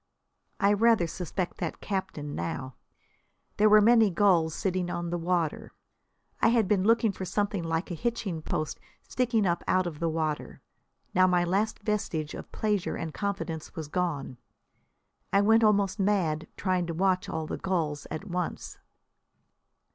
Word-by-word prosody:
I 200 0 +4
rather 225 -3 +4
suspect 175 +2 -4
that 170 - -4
captain 190 -7 -4
now. 130 +10 -4 0.8
There 215 +1 +5
were 215 0 +7
many 225 0 +6
gulls 175 -4 +3
sitting 185 -2 -1
on 175 -1 -3
the 175 - 0
water. 170 -2 -1 0.7
I - - +5
had 230 -3 +3
been 195 -2 +2
looking 225 0 +3
for 190 - -7
something 200 0 -1
like 165 +2 -2
a - - -1
hitching 200 -4 -2
post 155 0 -3 0.3
sticking 235 -4 +1
up 170 -1 0
out 185 0 +2
of 160 -4 -5
the 170 - 0
water. 155 -2 -3 0.5
Now 185 0 +5
my 180 -1 +3
last 200 +5 0
vestige 175 -8 -2
of - - -9
pleasure 210 -4 -1
and 160 -2 -5
confidence 190 -6 -4
was 160 -3 -5
gone. 150 -7 -2 0.9
I 200 - +4
went 225 +2 +5
almost 205 -1 +3
mad 185 -6 +1
trying 185 -2 0
to 165 - -4
watch 190 +2 +1
all 160 -3 -3
the - - -4
gulls 155 -6 -2
at 155 0 -5
once. 180 -1 -4
185 Hz, 155 wpm, -28 LUFS, 165-205 Hz, 0.9 s, were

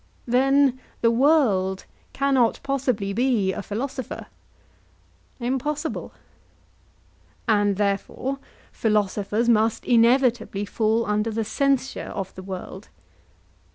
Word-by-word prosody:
Then 265 +1 +3 0.2
the 230 - +4
world 230 -9 +2 0.3
cannot 270 -4 +2
possibly 255 -8 -1
be 225 -5 +1
a - - -4
philosopher? 255 +6 -5 1.1
Impossible. 285 +5 -2 1.4
And 205 -2 +3
therefore 205 +7 -2 0.3
philosophers 210 +1 0
must 225 -1 +2
inevitably 235 -3 +3
fall 220 +2 +1
under 210 +2 0
the 225 0 -2
censure 275 +3 0
of 195 -1 -4
the 185 - -9
world? 190 +1 -8
230 Hz, 90 wpm, -24 LUFS, 205-265 Hz, 1.4 s, the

